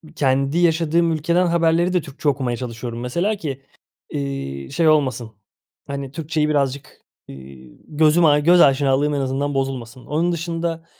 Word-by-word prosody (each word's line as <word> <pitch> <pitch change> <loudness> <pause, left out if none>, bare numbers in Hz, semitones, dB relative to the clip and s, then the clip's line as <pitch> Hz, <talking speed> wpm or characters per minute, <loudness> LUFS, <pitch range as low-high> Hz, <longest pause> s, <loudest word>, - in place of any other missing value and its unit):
kendi 135 +2 +1
yaşadığım 165 0 +2
ülkeden 170 +3 +1
haberleri 170 +1 +2
de 180 - +2
Türkçe 145 +1 -3
okumaya 130 -4 -2
çalışıyorum 120 -1 -6
mesela 170 - -1
ki, 140 -8 -6 0.5
ııı, 135 - -5
şey 160 +3 +1
olmasın, 130 -7 +1 0.6
hani, 140 -1 -5
Türkçeyi 155 0 -1
birazcık, 140 -2 -2 0.3
ııı, 70 - -10 0.5
gözüm 155 +2 +3
a 145 -1 +5
göz 170 +4 +5
aşinalığım 140 +1 +3
en 145 - -1
azından 135 +2 -2
bozulmasın. 130 -3 -4
Onun 165 +4 0
dışında, 165 0 -3
145 Hz, 140 wpm, -21 LUFS, 135-165 Hz, 0.6 s, a